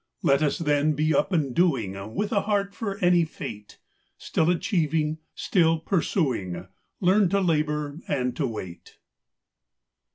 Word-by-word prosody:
Let 140 +1 +3
us, 150 -2 +1
then, 150 -1 +2
be 155 +2 +1
up - - +1
and 150 -8 0
doing, 110 - 0
With 210 0 -1
a 200 - +2
heart 200 -1 -1
for 200 -2 -4
any 175 -1 +5
fate; 105 -9 -8 0.4
Still 160 +1 0
achieving, 160 -4 0 0.2
still 165 -4 +2
pursuing, 130 - -1 0.3
Learn 190 +1 +4
to 200 +2 +2
labor 150 -4 0
and 125 -3 -1
to 140 - 0
wait. 95 -7 -8
155 Hz, 135 wpm, -25 LUFS, 135-180 Hz, 0.4 s, any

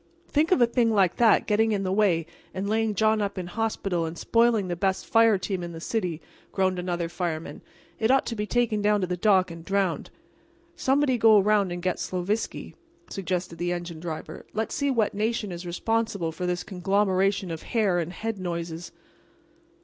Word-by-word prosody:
"Think 310 +4 +1
of 365 - +5
a 240 - +6
thing 235 0 +1
like 195 -5 +2
that 230 -3 +4
getting 220 +1 +2
in 195 -1 -1
the 185 - -1
way 190 -5 +2 0.3
and 190 +2 -2
laying 220 0 0
John 220 +1 +2
up 200 -1 -2
in 185 - -3
hospital 195 -2 -2
and 165 +1 -5
spoiling 230 -2 +2
the 175 - -2
best 190 +1 -1
fire 225 -2 +4
team 190 0 -3
in 170 -1 -6
the 165 - -7
city," 175 -4 -3 0.3
groaned 185 -2 0
another 175 -1 -2
fireman. 170 -2 -4 0.4
"It 220 - +1
ought 270 +1 +4
to 230 - -3
be 210 -1 -3
taken 235 -3 +1
down 210 0 +2
to - - +1
the 180 0 -2
dock 185 -1 +3
and 165 0 -9
drowned." 195 -2 -1 0.7
"Somebody 270 -4 +2
go 220 -1 +7
around 200 -2 +3
and 175 0 -5
get 185 -1 -1
Sloviski," 185 +5 -3 0.4
suggested 180 -3 -3
the 175 0 -1
engine 175 -2 -5
driver, 160 -2 -6
"and - - -14
let's 220 0 -2
see 280 -1 0
what 230 -6 +1
nation 215 -1 -1
is 175 0 -7
responsible 200 -1 -1
for 180 +3 -4
this 180 0 -1
conglomeration 195 0 +1
of 160 - -5
hair 205 -6 +1
and 170 0 -3
head 220 +2 -4
noises." 170 -1 -5
195 Hz, 195 wpm, -26 LUFS, 175-220 Hz, 0.7 s, go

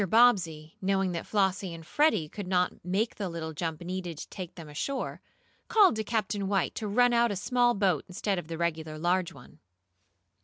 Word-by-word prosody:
Bobbsey, 175 -10 +3
knowing 195 -1 +1
that 170 -1 -4
Flossie 190 -3 0
and 165 -1 -11
Freddie 220 - +2
could 200 +4 -7
not 180 -1 0
make 195 +6 0
the 200 -3 -4
little 160 -1 -5
jump 160 +1 -3
needed 175 -2 -4
to - - -8
take 180 -3 -7
them 165 -3 -9
ashore, 210 - -3 0.5
called 410 - +5
to 220 - -1
Captain 205 -2 -1
White 195 -2 +1
to 215 - -4
run 245 +4 +4
out 235 0 +4
a 205 - -2
small 240 +4 +2
board 190 -7 +1
instead 190 +1 -1
of 170 - -9
the 165 0 -5
regular 160 -2 -2
large 175 +2 +1
one. 140 -6 -15
185 Hz, 190 wpm, -29 LUFS, 165-215 Hz, 0.5 s, called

